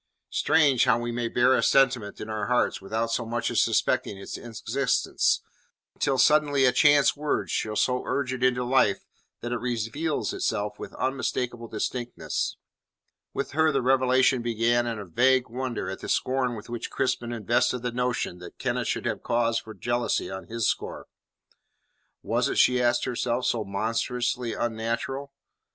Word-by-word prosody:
Strange 145 -5 +3
how 125 -3 +4
we 120 0 -3
may 120 0 -2
bear 125 +2 +3
a - - +3
sentiment 125 -6 +2
in 105 - -6
our 110 -2 -3
hearts 125 -4 +1
without 110 +4 -2
so 120 - 0
much 115 +1 -2
as - - +3
suspecting 100 - +1
its 100 - -7
existence, 120 +3 0 0.5
until 135 -2 0
suddenly 145 0 +4
a 125 - +5
chance 145 +1 +5
word 150 0 -2
shall 110 -1 -1
so 125 +3 +1
urge 130 -2 -1
it 130 -1 -4
into 125 -1 +2
life 125 -5 +2 0.4
that 120 - -4
it 120 - -1
reveals 125 +6 -2
itself 105 0 -2
with - - -7
unmistakable 125 -2 -2
distinctness. 120 +2 -3 0.7
With - - -4
her 160 +2 +3
the 135 -3 0
revelation 130 -1 +3
began 120 +1 +1
in 115 -2 -3
a 105 - -6
vague 130 +8 +2
wonder 125 -1 -3
at - - -5
the - - -7
scorn 130 -2 0
with 105 - -9
which 120 -1 -5
Crispin 125 -2 -1
invested 120 +2 0
the 125 - -1
notion 125 -7 -2
that 90 - -11
Kenneth - - -2
should - - -2
have - - -2
cause 115 -1 +1
for 110 -1 -11
jealousy 120 -3 -1
on 95 0 -7
his 115 -1 -1
score. - - -3 1.2
Was - - 0
it, - - -2
she 125 0 +4
asked 120 0 +2
herself, 125 0 -1
so 115 -2 0
monstrously 115 +4 -2
unnatural? 120 +4 -3
120 Hz, 165 wpm, -26 LUFS, 115-130 Hz, 1.2 s, a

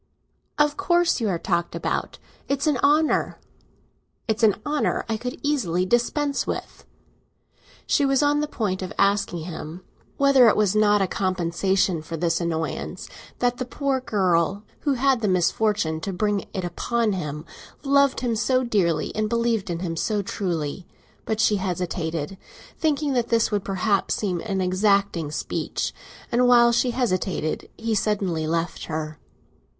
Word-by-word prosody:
"Of 295 0 +2
course 350 -6 +2
you 220 - +1
are 180 - 0
talked 170 0 -1
about. - - -2 0.3
It's 275 0 0
an 300 -4 +2
honour!" 295 +4 +2 0.9
"It's 220 0 0
an 215 -3 +5
honour 295 0 0
I 225 - -1
could 250 +3 -5
easily 195 - 0
dispense 275 +7 0
with." - - -5 1.0
She 290 - +2
was 275 +1 +3
on 290 0 +3
the 300 - -1
point 200 -9 -2
of 185 - -5
asking 200 -4 +1
him 165 +1 -7 0.3
whether 275 -3 +6
it 215 - +4
were 215 - +4
not 210 -1 +4
a - - 0
compensation 185 -1 0
for 165 +1 -6
this 165 +1 0
annoyance 160 -1 -3 0.3
that 245 0 +1
the 255 - -2
poor 270 +1 -1
girl 190 -3 +1 0.2
who 285 - 0
had 265 -1 +2
the 215 - +1
misfortune 185 -2 +1
to 195 - -3
bring 205 +2 -1
it 190 - -4
upon 220 +5 -1
him, 150 -4 -4 0.4
loved 280 -1 +3
him 240 -3 0
so 255 +4 +1
dearly 195 -9 0
and 215 0 0
believed 230 -3 0
in 170 0 -3
him 170 -3 -3
so 205 +4 -1
truly; 175 -3 -3 0.4
but 220 -1 -2
she 215 -2 +3
hesitated, 175 -2 -3 0.4
thinking 300 -2 0
that 240 -2 0
this 230 -1 +2
would 205 -2 0
perhaps 195 +1 0
seem 185 -5 -2
an 195 -2 -1
exacting 185 -3 +1
speech, 150 - -3 0.4
and 245 +1 +3
while 240 -1 +6
she 245 +2 +2
hesitated, 190 -9 -1
he 225 0 -2
suddenly 195 -6 0
left 165 +1 -2
her. 155 -1 -5
205 Hz, 155 wpm, -24 LUFS, 175-245 Hz, 1.0 s, whether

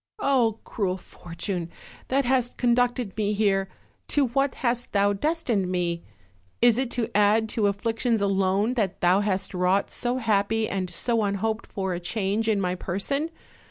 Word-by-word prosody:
Oh, 255 - +2
cruel 190 -4 -2
fortune! 170 0 -5 0.4
that 270 +1 +1
hast 250 -1 +1
con 240 -1 +3
ducted 245 -4 0
me 210 -1 0
here, 195 -2 +1 0.4
to 280 -4 +2
what 275 +2 +1
hast 240 0 0
thou 200 0 +3
destined 230 - 0
me? 175 -2 -1 0.6
Is 240 0 +5
it 260 -2 0
to 230 -2 -2
add 210 +2 +4
to 210 -2 +1
afflictions 225 +3 0
alone, 195 +3 +1
that 210 -7 -1
thou 180 +2 +4
hast 195 -2 -1
wrought 185 +2 +1
so 245 +1 -1
happy 220 -1 +1
and 185 -2 -2
so 225 +7 0
unhoped 210 +2 -1
for 190 -2 -3
a 175 - -3
change 205 +4 -1
in 215 -2 +2
my 180 -2 0
person? 200 - -2
210 Hz, 160 wpm, -25 LUFS, 195-240 Hz, 0.6 s, Is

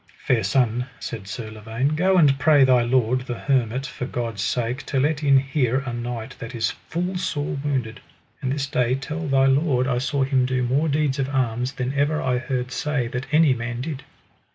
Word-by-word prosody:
Fair 115 -4 +2
son, 125 +3 +1
said 110 -4 -6
Sir 110 +1 -6
Lavaine, 110 +5 -2
go 185 +5 +2
and 140 -5 +5
pray 145 0 +5
thy 130 -2 +5
lord, 125 +1 +2
the 125 -2 -5
hermit, 130 -1 0
for 125 -1 -5
God's 115 -6 -3
sake 120 +5 -1
to 135 - 0
let 145 +2 +1
in 140 -2 +5
here 135 -1 +1
a 120 - -4
knight 120 -1 -5
that 115 +2 -7
is 115 - 0
full 180 +2 -4
sore 145 -5 -2
wounded; 130 -6 -2 0.4
and 130 -2 -1
this 140 0 -1
day 125 -2 +1
tell 150 +5 -4
thy 135 -1 +3
lord 135 -1 +2
I 125 -2 0
saw 135 +1 0
him 130 -1 +2
do 130 -1 0
more 140 +6 +1
deeds 145 -1 0
of 135 0 0
arms 125 -1 -1
than 125 +1 -3
ever 145 +2 +1
I 125 -1 0
heard 125 0 -3
say 145 -2 -1
that 125 +2 -4
any 155 -2 +5
man 120 0 -4
did. 140 -1 -5
130 Hz, 200 wpm, -23 LUFS, 120-140 Hz, 0.4 s, and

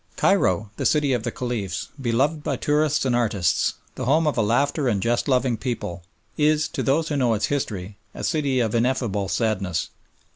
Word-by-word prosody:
Cairo, 105 - +2
the - - -2
City 150 -3 +2
of 120 - 0
the 120 - -2
Caliphs, 115 -7 -4
beloved 135 +6 +1
by 145 -3 -1
tourists 150 +2 +1
and 125 -2 +2
artists, 105 -7 +1 0.2
the - - -5
home 155 +6 +3
of 150 - +1
a 115 - +2
laughter 135 +6 +1
and 105 -5 +1
jest 115 +4 0
loving 125 -3 +2
people, 105 -7 -4 0.4
is, 150 0 +3
to - - -3
those 155 +4 +1
who 150 - -1
know 120 -4 +2
its 105 - 0
history, 100 -8 -3 0.2
a - - -6
city 140 -5 +1
of 110 -3 0
ineffable 115 -5 0
sadness. 95 -6 -1
120 Hz, 185 wpm, -23 LUFS, 105-145 Hz, 0.4 s, home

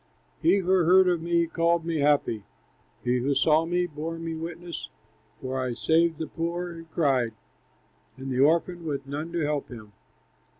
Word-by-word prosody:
"He 175 +5 +4
who 190 -3 -3
heard 185 0 +5
of 175 -2 +1
me 170 0 +2
called 165 0 +1
me 165 -1 -1
happy, 140 -7 +2 0.6
He 125 +1 +1
who 140 +3 0
saw 160 +2 +3
me 175 +1 +1
bore 165 0 -5
me 165 0 -4
witness, 170 +1 -6 0.5
For 130 0 -3
I 125 -2 -2
saved 160 +7 +2
the 160 - -3
poor 170 +2 -3
who 165 0 -10
cried, 135 -8 +1 0.8
And 135 0 -6
the 125 - -1
orphan 170 +4 +2
with 145 -4 -3
none 150 +4 -5
to 170 -1 -1
help 150 -1 -1
him. 110 -4 -11
165 Hz, 170 wpm, -26 LUFS, 140-170 Hz, 0.8 s, heard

